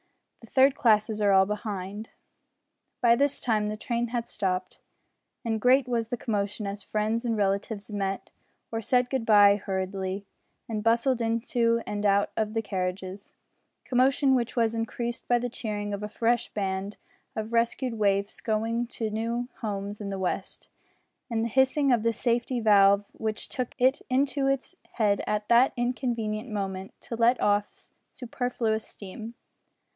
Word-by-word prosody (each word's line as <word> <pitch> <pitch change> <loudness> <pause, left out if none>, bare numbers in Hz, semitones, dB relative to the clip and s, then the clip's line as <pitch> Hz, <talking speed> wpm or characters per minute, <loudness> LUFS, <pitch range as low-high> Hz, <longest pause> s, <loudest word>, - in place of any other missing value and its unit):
The 230 - -14
third 265 +3 +5
classes 215 -4 +2
are 205 -1 +4
all 190 0 +6
behind." 205 0 -5 0.9
By 235 -1 +6
this 285 +3 +1
time 215 -3 +1
the 215 0 -3
train 235 +2 -1
had 235 0 -3
stopped, 185 -1 -2 0.7
and 225 -2 -1
great 255 +2 +4
was 235 -2 -1
the 245 - -2
commotion 205 -2 -2
as 200 +1 -4
friends 215 +3 -1
and 230 -2 0
relatives 200 +1 -1
met 195 -1 -3 0.4
or 225 0 -2
said 250 +2 +1
good 260 -4 -1
bye 205 -2 +7
hurriedly, 190 0 -3 0.4
and 215 -2 -3
bustled 235 +2 +2
into 230 0 +1
and 205 0 -3
out 200 0 +3
of 215 0 -1
the 225 - 0
carriages 185 0 -4 0.5
commotion 265 +2 +3
which 235 -3 0
was 230 -2 +2
increased 235 +1 -3
by 245 - +4
the 245 +1 -2
cheering 210 -3 -4
of 200 - -4
a 210 - -4
fresh 235 +2 +1
band 195 0 -3 0.4
of 220 +1 -4
rescued 235 +2 +1
waifs 200 -2 0
going 230 +2 -1
to 225 -2 -4
new 230 +3 -2
homes 205 -1 -4
in 200 - -4
the 195 -1 -4
west, 185 - -3 0.6
and 225 -1 0
the - - -2
hissing 265 +3 +3
of 240 -3 +3
the 230 +1 +2
safety 240 +2 0
valve 200 -2 +5
which 220 -1 -4
took 255 -2 -4
it 260 +2 +3
into 270 +1 +1
its 275 +6 -1 0.2
head 205 -3 +1
at 210 0 -1
that 240 +3 +5
inconvenient 240 -2 -2
moment 195 -2 -4
to 235 - -6
let 235 +2 +3
off 205 0 0 0.2
superfluous 240 -3 -2
steam. 220 +4 -9
225 Hz, 160 wpm, -27 LUFS, 205-240 Hz, 0.9 s, bye